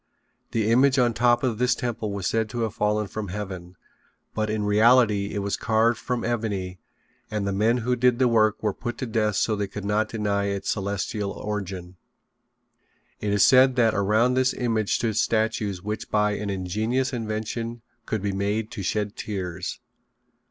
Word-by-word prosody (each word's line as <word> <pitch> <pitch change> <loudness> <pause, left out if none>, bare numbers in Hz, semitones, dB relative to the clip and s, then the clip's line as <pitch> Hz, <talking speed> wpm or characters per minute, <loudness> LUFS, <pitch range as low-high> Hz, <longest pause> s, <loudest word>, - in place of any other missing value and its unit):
The 110 -1 0
image 130 +3 +4
on 120 -2 +4
the 115 - -9
top 120 0 +4
of 120 -4 0
this 125 0 +3
temple 115 -3 -3
was 100 -2 -4
said 110 +1 0
to 120 +2 -4
have 110 -3 -1
fallen 105 0 0
from 105 +1 -5
heaven, 95 -2 -6 0.6
but 110 -1 -1
in 105 -1 -1
reality 105 -1 +4
it 100 - -1
was 100 - -1
carved 110 +1 +2
from 125 -2 -2
ebony 100 -6 -2 0.5
and 105 -2 -2
the 100 - -1
men 110 +5 +2
who 125 0 +2
did 125 0 +3
the 130 0 +3
work 110 -2 +2
were 105 -2 +1
put 120 +2 -5
to - - -3
death 110 -3 0
so 110 - +1
they 100 -1 -2
could 100 +1 -7
not 105 +1 +1
deny 105 -2 -1
its 100 -1 -2
celestial 100 0 -2
origin. 95 -4 -5 1.2
It 105 - -2
is 100 -1 +5
said 130 0 +6
that 115 -3 +3
around 110 +5 +2
this 130 0 +2
image 115 -4 0
stood 110 -3 -1
statues 110 -5 0
which 105 +1 -4
by 105 -1 +2
an 105 0 -3
ingenious 110 +8 -1
invention 115 +1 -4 0.2
could 110 -3 -2
be 100 - 0
made 100 +3 -2
to - - -5
shed 105 +2 -2
tears. 95 -5 -5
110 Hz, 180 wpm, -25 LUFS, 100-115 Hz, 1.2 s, said